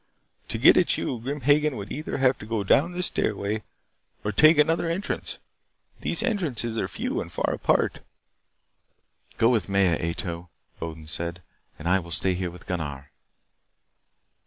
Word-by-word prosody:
To - - -1
get - - +7
at - - +3
you, 125 - -2
Grim 140 +5 -4
Hagen 145 +1 +3
would 100 0 -7
either 155 +2 -4
have 130 -1 +3
to 105 - -9
go 110 -2 -1
down 150 - +3
this 180 0 -1
stairway 105 +1 -1 0.6
or 105 - -1
take 155 +9 +6
another 165 +3 +3
entrance. 180 +5 -3 0.6
These - - 0
entrances, 155 - -1
are - - -1
few - - -3
and - - -8
far - - -1
apart." - - +1 1.4
"Go 115 - +4
with 115 -5 +1
Maya, 95 -3 +3
Ato," 85 +1 -4 0.3
Odin 80 -1 -6
said, 85 +3 -4 0.3
"and 75 - -6
I 95 +2 +4
will 85 -2 -10
stay 95 +3 +2
here 90 0 -2
with 90 +1 -13
Gunnar." 70 -6 -4
105 Hz, 160 wpm, -26 LUFS, 85-145 Hz, 1.4 s, get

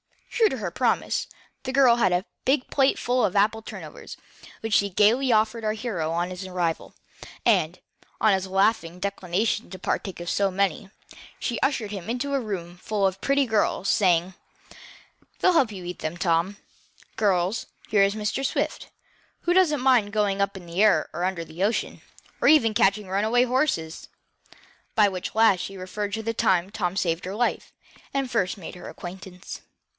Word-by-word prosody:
True 450 -2 +3
to 265 - -4
her 200 -6 -4
promise, 245 +4 0 0.3
the 260 - -4
girl 260 -3 +5
had 195 -6 +3
a 180 +3 +1 0.2
big 265 0 +1
plate 270 -1 +3
full 250 +1 +1
of 185 - 0
apple 210 +2 +2
turnovers, - - -9 0.4
which 225 -1 -3
she 200 0 +3
gaily 230 +7 +3
offered 220 +1 +2
our 215 0 0
hero 215 -8 -3
on 175 +2 -1
his 185 +1 -6
arrival, 175 -3 -2 0.5
and, - - +3 0.4
on 215 -2 +4
his 190 0 -1
laughing 190 -3 +1
declination 200 +3 -1
to 185 - -8
partake 190 0 -3
of 175 - -7
so 200 -1 +2
many, 195 0 -1 0.5
she 240 - -3
ushered 235 -7 0
him 195 -1 -6
into 255 +4 -2
a 275 - +2
room 180 -7 -5
full 205 +2 -1
of 190 0 -1
pretty 275 0 +2
girls, 215 -4 0
saying: 180 -2 +2 1.1
"They'll 365 - +4
help 265 -9 +3
you 190 -3 -8
eat 180 0 -6
them, 155 +2 -4
Tom. 175 +2 +1 0.6
Girls, 195 0 +1 0.2
here 205 - +4
is 195 +1 +3
Mr. 215 +5 -2
Swift, 275 - -2 0.5
who 350 - +1
doesn't 330 -7 +3
mind 250 -6 +3
going 205 -2 +1
up 200 0 -1
in 180 - -11
the 170 +3 -2
air 205 -8 +4
or 170 +3 -3
under 180 -3 -2
the 160 +4 -5
ocean, 215 +3 -1 0.4
or - - +3
even 275 -7 +5
catching 200 0 +2
runaway 215 +6 +2
horses," 250 - -1 0.9
by 210 -2 +5
which 185 0 -5
last 220 -4 +5
she 195 +2 -6
referred 200 +2 -4
to 220 - -3
the 230 +1 -2
time 190 -5 +1
Tom 185 -3 -2
saved 170 -2 0
her 190 +2 -5
life, 240 +2 -1 0.4
and 270 -2 -1
first 195 -3 0
made 185 - -8
her 180 - -9
acquaintance. 185 +1 -9
200 Hz, 180 wpm, -25 LUFS, 185-230 Hz, 1.1 s, girl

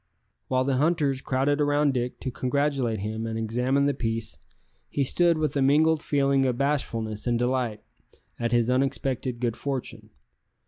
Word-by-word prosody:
While 130 0 +1
the 130 -1 0
hunters 145 -3 +1
crowded 135 +3 0
round 145 -1 +2
Dick 125 -1 -2
to 130 - -3
congratulate 130 -4 0
him 110 +2 -3
and 110 0 -3
examine 125 +5 +1
the 145 - +2
piece, 115 -2 -3 0.5
he 140 - 0
stood 170 +5 +2
with 155 -2 -1
a 140 - +1
mingled 155 +3 +4
feeling 140 -2 +2
of 125 -2 -1
bashfulness 115 -6 -1
and 120 -1 +2
delight 120 -3 -1 0.6
at 115 -1 -1
his 120 -1 +3
unexpected 130 -2 -1
good 120 -2 -1
fortune. 120 -5 -5
130 Hz, 155 wpm, -26 LUFS, 115-140 Hz, 0.6 s, mingled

